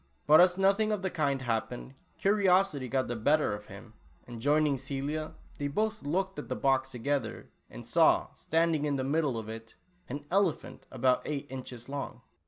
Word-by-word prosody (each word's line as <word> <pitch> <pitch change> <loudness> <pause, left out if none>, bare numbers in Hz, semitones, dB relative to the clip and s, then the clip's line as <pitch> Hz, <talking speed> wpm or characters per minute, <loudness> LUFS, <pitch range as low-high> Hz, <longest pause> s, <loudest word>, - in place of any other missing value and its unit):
But 155 +3 +8
as 180 0 +4
nothing 200 +3 +3
of 210 -2 -2
the 190 - -1
kind 140 -5 0
happened, 120 +2 -3 0.2
curiosity 190 -8 +2
got 130 +1 0
the 120 - -3
better 145 +2 +2
of 105 0 -7
him, 100 +3 -12 0.3
and 120 -2 -9
joining 145 0 +2
Celia, 140 +4 -4 0.2
they 145 - -1
both 215 +8 -1
looked 190 +6 -2
into - - -7
the - - -1
box 135 -1 +1
together, 135 +3 -3 0.2
and - - -10
saw, - - +3
standing 165 -2 0
in 145 -1 0
the 130 - -1
middle 140 -2 0
of 110 -1 -5
it, 115 0 -9 0.3
an 140 +3 -4
elcpJiaiit 190 -3 0
about 130 0 +2
eight 145 -2 -3
inches 125 -2 -7
long 140 0 -6
145 Hz, 180 wpm, -30 LUFS, 130-170 Hz, 0.3 s, But